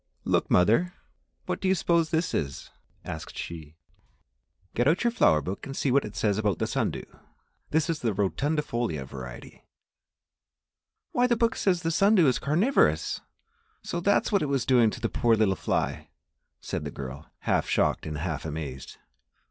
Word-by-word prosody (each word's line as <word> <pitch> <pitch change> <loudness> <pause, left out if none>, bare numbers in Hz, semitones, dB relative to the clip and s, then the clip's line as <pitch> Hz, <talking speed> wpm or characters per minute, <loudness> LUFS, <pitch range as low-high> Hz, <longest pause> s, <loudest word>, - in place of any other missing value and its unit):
"Look, - - +1
mother, 115 - +3 0.5
what - - -3
do 190 - 0
you 190 - +4
suppose 170 -2 +2
this 165 +1 0
is?" 70 -2 -3 0.3
asked 80 - -7
she. 80 -2 -7 1.0
"Get 120 +3 +1
out 165 +8 +3
your 235 - +3
flower 80 - +4
book 95 +6 -5
and 135 - -6
see 135 - +1
what 140 +2 +3
it 105 0 -8
says 105 -2 +1
about 105 -5 +1
the - - -1
sun - - 0
dew; - - -6 0.6
this 160 +1 +1
is 165 -2 -1
the 115 - 0
rotundifolia 120 - -1
variety." 65 -2 -10 1.5
"Why, 245 0 +3
the 235 -1 +2
book 230 0 +2
says 180 -3 +1
that - - -16
the 165 - 0
sun 200 +6 +4
dew 175 -7 +5
is 130 - +2
carnivorous! 180 - +2 0.6
So 170 - -3
that 200 +4 +3
is - - -3
what 200 - +3
it 150 - 0
was 135 -4 0
doing 120 -4 +5
to - - -7
the - - 0
poor 115 -1 +2
little 105 -3 +2
fly?" - - -2 0.5
said - - -4
the - - -4
girl, 70 +2 -8
half - - 0
shocked - - +1
and 75 -1 -4
half 80 0 -3
amazed. 75 -4 -6
120 Hz, 180 wpm, -27 LUFS, -, 1.5 s, dew